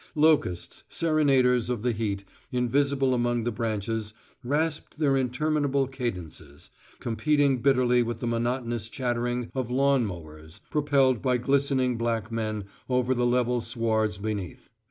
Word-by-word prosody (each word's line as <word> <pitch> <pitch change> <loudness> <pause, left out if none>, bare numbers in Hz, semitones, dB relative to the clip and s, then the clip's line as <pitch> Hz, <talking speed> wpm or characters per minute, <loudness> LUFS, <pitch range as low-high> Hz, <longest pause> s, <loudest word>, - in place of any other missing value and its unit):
Locusts, 150 - +1
serenaders 135 -7 +2
of 120 -3 -2
the 125 - +2
heat, 105 -3 -2 0.3
invisible 135 +2 +1
among 120 -1 0
the 120 - -1
branches, 110 -1 -3 0.3
rasped 150 +5 -1
their 145 -3 +2
interminable 140 +2 +1
cadences, 90 - -6 0.3
competing 135 +3 +1
bitterly 125 -2 +3
with 120 0 -2
the - - -4
monotonous 120 -1 -1
chattering 120 -1 -2
of 130 -3 -2
lawn 135 -1 +2
mowers 80 -3 -10
propelled 140 -5 +2
by 130 -2 +2
glistening 130 -1 +1
black 115 -2 -1
men 110 -2 -2 0.3
over 125 0 +2
the 120 -1 +1
level 125 0 +1
swards 110 -3 0
beneath. 100 -4 -5
120 Hz, 130 wpm, -27 LUFS, 115-135 Hz, 0.3 s, bitterly